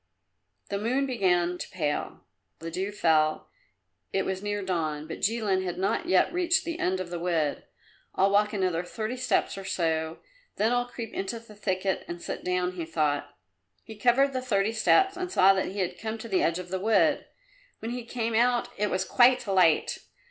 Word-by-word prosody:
The 200 - -2
moon 255 +6 +1
began 180 -8 +1
to - - -6
pale; 150 -5 -3 0.4
the 165 0 -7
dew 190 +4 -2
fell; 155 -5 +1 0.6
it 195 - 0
was 190 0 -2
near 205 0 -2
dawn, 155 -5 -2
but 165 - -6
Jilin 205 -3 +1
had 180 -2 -4
not 195 - -1
yet 355 - +3
reached 345 -2 +2
the 335 0 -4
end 185 +1 0
of 180 -2 -5
the 175 - -3
wood. 165 -4 -1 0.5
"I'll 195 +1 +3
walk 210 +1 +3
another 185 -5 0
thirty 220 +6 -4
steps 250 -5 0
or - - -7
so 160 -3 -1 0.4
then 220 +3 +1
I'll 245 0 +1
creep 235 -2 -7
into 195 +4 -3
the 225 -2 -15
thicket 190 -2 -1
and 175 0 -6
sit - - -6
down," 180 0 0
he 175 -3 -5
thought. 150 -3 -1 0.5
He 220 - -10
covered 250 +5 +3
the 255 - -1
thirty 215 -4 +1
steps 385 - +3
and 365 0 -4
saw 195 - +6
that 190 - -1
he 195 +1 -3
had 180 - -3
come 220 0 -4
to 225 - -8
the 195 -4 +1
edge 165 +1 +1
of 180 -1 -7
the 190 +1 -2
wood. 220 +3 +2 0.5
When 225 - -5
he 245 0 -4
came 230 -1 -3
out 240 +1 +2
it 210 0 +1
was 185 0 -1
quite 250 +2 +4
light. 185 -6 +3
195 Hz, 195 wpm, -27 LUFS, 180-230 Hz, 0.6 s, saw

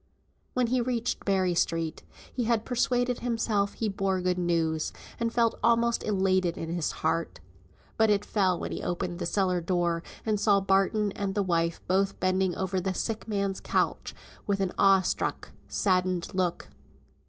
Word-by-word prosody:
When 250 -1 +3
he 245 +1 +1
reached 240 -1 -2
Berry 190 -2 +2
Street, 165 -1 -1 0.3
he 245 - -1
had 225 -1 +1
persuaded 245 0 +1
himself 225 -4 0
he 225 - -2
bore 195 -2 0
good 180 0 0
news, 165 -3 0 0.3
and 230 0 0
felt 230 -1 +1
almost 235 0 +3
elated 190 -4 +1
in 165 - -5
his 170 -3 -1
heart. 165 - 0 0.6
But 220 0 +4
it 205 0 +2
fell 185 -4 +1
when - - -4
he - - -4
opened 175 0 -3
the - - -2
cellar 185 -2 +1
door, 170 -1 0 0.2
and 215 -2 +1
saw 205 -1 +4
Barton 195 +2 +2
and 195 -1 -3
the 205 - +2
wife 170 -2 0
both 195 +1 +1
bending 185 -1 +1
over 190 0 -1
the 190 +1 -2
sick 225 +3 -3
man's 200 -2 -1
couch - - -1 0.3
with 200 -1 +1 0.2
awe 195 -1 +5
struck, - - -2 0.2
saddened 185 -1 0
look. 180 -2 -1
195 Hz, 165 wpm, -28 LUFS, 180-220 Hz, 0.6 s, awe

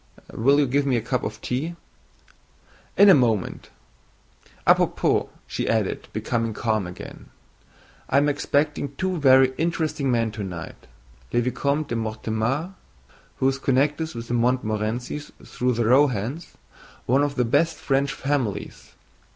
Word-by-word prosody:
Will 140 +5 +3
you 145 - +4
give 140 +3 +1
me 130 -3 +2
a - - -1
cup 125 +2 -1
of 110 - -5
tea?" 150 +8 -3 1.2
"In 200 - +8
a 195 - +9
moment. 115 - +1 1.0
À - - +7
propos," - - +1 0.2
she - - -3
added, - - -1
becoming 115 -1 -2
calm 110 -5 -1
again, 90 - -10 0.8
"I - - +3
am 145 +1 +4
expecting 145 -1 0
two 185 0 -2
very 130 -2 +5
interesting 160 -4 -1
men 115 -3 +1
tonight, 95 -6 -7 0.4
le 120 - +2
Vicomte 140 +4 -1
de 115 - -2
Mortemart, 115 - -2 0.6
who 130 - +1
is 135 0 0
connected 145 +3 0
with 115 0 -6
the 120 - -3
Montmorencys 120 +2 -1
through 125 0 -1
the 115 0 0
Rohans, 130 - +1 0.5
one 130 +4 +3
of 145 -1 0
the 125 - +1
best 165 +8 +2
French 140 0 0
families. 135 -7 -3
130 Hz, 140 wpm, -24 LUFS, 115-145 Hz, 1.2 s, a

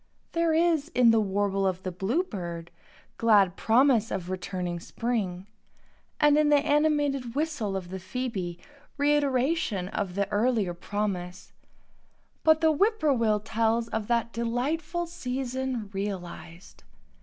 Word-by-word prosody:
There 335 -1 +1
is, 320 -2 +2
in 245 -2 +6
the 225 - +4
warble 195 -1 0
of 185 0 -2
the 185 - -3
bluebird, 185 - -3 0.5
glad 205 -5 +4
promise 230 0 +3
of 180 0 -4
returning 180 -1 -3
spring; 195 -3 -3 0.7
and 295 0 +5
in 300 -1 +3
the 295 - +6
animated 290 -4 +1
whistle 285 -10 -1
of 180 -2 -7
the 190 +1 -5
phoebe 190 -4 -4 0.4
reiteration 280 - +1
of 195 -4 -3
the 200 0 0
earlier 215 -4 +1
promise; 180 -1 -4 0.9
but 315 0 +5
the 320 -1 +4
whippoorwill 285 - +2
tells 225 +1 0
of 220 -2 -3
that 235 -1 0
delightful 300 +9 -2
season 260 -7 -4
realized. 180 - -6
230 Hz, 120 wpm, -27 LUFS, 190-285 Hz, 0.9 s, in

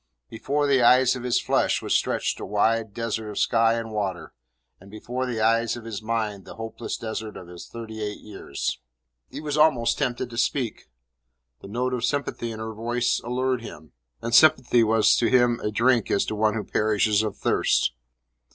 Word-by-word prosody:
Before 145 +6 -1
the 140 -2 +3
eyes 125 +2 +5
of 125 - -6
his 125 -1 +1
flesh - - +1
was - - -2
stretched - - 0
a - - -6
wide 110 +2 +1
desert 110 0 -4
of 105 - -7
sky 115 -1 +3
and 115 -1 -4
water, 100 -4 -4 0.5
and 95 - -16
before 125 +5 -4
the 120 -3 -3
eyes 115 +1 +2
of 115 - -10
his 110 -3 -5
mind 110 -3 -2
the - - -11
hopeless 115 +1 -5
desert 110 -1 -5
of 90 - -10
his 85 0 -10
thirty 110 -2 -8
eight 105 -1 -4
years. 95 - -5 0.5
He - - -7
was 150 -1 -3
almost 130 -7 +3
tempted 125 -3 -2
to 115 - -8
speak. 120 - -2 0.7
The - - -10
note 125 +5 -2
of 125 -2 -2
sympathy 125 -4 -2
in 110 - -7
her 110 0 -5
voice 120 +2 -1
allured 125 +1 -1
him, 80 -8 -11 0.3
and 115 0 -3
sympathy 125 -5 +5
was 110 0 +4
to 120 - +2
him 120 -2 +3
as 105 - -1
drink 120 +1 +2
to 100 - 0
one 110 0 +1
who 110 - -2
perishes 105 0 +1
of 110 -3 -4
thirst. - - +1
115 Hz, 190 wpm, -25 LUFS, 110-125 Hz, 0.7 s, eyes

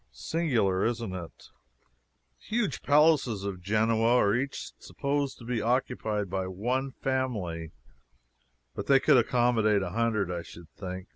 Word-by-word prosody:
Singular, 110 - 0
isn't 115 -4 -1
it? 85 -3 -7 0.9
The - - -26
huge 215 - -1
palaces 145 -8 +3
of 95 -2 -4
Genoa 110 +4 +2
are 100 -4 +3
each 135 +4 -3
supposed 140 -1 -2
to - - -13
be 120 -2 -1
occupied 110 -3 -1
by 95 0 -2
one 120 +9 -2
family, 105 -12 -2 1.0
but 100 - -6
they 135 -1 +6
could 130 - +5
accommodate 115 -4 +2
a - - -4
hundred, 110 -5 0
I 85 -1 -3
should 85 0 -13
think. 95 0 -7
115 Hz, 140 wpm, -28 LUFS, 95-130 Hz, 1.0 s, they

